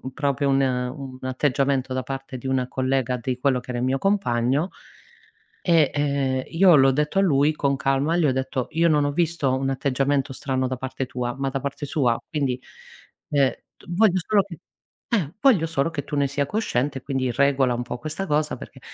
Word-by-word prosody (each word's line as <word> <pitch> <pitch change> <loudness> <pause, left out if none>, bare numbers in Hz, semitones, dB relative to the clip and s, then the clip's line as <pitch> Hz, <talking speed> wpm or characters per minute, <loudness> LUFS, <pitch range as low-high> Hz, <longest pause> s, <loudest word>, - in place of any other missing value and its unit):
un 130 - -6
proprio 140 -2 0
un 135 0 +3
un 130 +1 -3
atteggiamento 135 0 0
da 130 - -1
parte 135 0 -6
di 130 - -9
una 130 -1 0
collega 130 -1 0
di 125 +1 -3
quello 130 -1 +1
che 125 - -11
era 120 - -2
il 125 - -1
mio 135 +1 +1
compagno 145 -5 +1 0.9
e 165 -5 +4
ehm 140 -3 0
io 175 -1 +5
l'ho 135 0 +6
detto 150 +7 0
a - - +3
lui 150 -4 +3
con 140 -2 0
calma. 135 +4 +1
Gli 170 -3 +3
ho 135 - +3
detto: 130 -1 -2
"Io 165 +2 +2
non 150 -2 +3
ho 145 - 0
visto 160 -5 +1
un 135 0 -1
atteggiamento 135 +1 0
strano 130 -1 -1
da 130 - -3
parte 130 +1 -4
tua, 120 -1 -3
ma 135 0 -1
da 135 0 -3
parte 140 +2 -4
sua. 125 -5 +1
Quindi, 135 -5 -1 0.7
ehm, 140 -3 +3 0.4
voglio 185 0 +3
solo 205 -2 +4
che 175 -5 -10 0.5
eh 180 -8 0
voglio 225 - +4
solo 165 -1 0
che 145 -4 -4
tu - - -6
ne 140 -1 +2
sia 140 +1 -1
cosciente, 140 - -1
quindi 130 -3 -1
regola 135 -1 +2
un 120 - -2
po' 120 0 -5
questa 155 +7 -4
cosa 150 -3 0
perché" - - -12
135 Hz, 200 wpm, -24 LUFS, 130-150 Hz, 0.9 s, l'ho